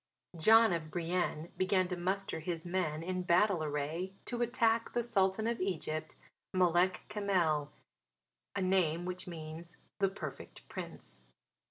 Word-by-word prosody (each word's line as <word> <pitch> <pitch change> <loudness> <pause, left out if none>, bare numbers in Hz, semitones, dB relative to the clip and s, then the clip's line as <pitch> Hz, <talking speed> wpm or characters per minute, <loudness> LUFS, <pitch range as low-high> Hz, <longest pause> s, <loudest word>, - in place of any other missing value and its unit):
John 220 +5 +6
of 160 -2 -3
Brienne 170 0 -1
began 185 0 +2
to 180 - -1
muster 190 +2 -1
his 165 0 -4
men 175 -3 -1
in 185 +1 -2
battle 180 0 +3
array 155 +5 -2
to 240 -1 -3
attack 230 -1 +2
the 240 - +1
Sultan 200 -2 +2
of 230 -2 -1
Egypt, 155 -4 -2 0.4
Malek 180 0 +3
Kamel, 175 -8 +1 0.8
a 200 - 0
name 175 -3 +2
which 180 0 -5
means 165 0 -8 0.2
"the 195 -1 +3
Perfect 195 - -8
Prince." - - -8
180 Hz, 135 wpm, -33 LUFS, 160-195 Hz, 0.8 s, John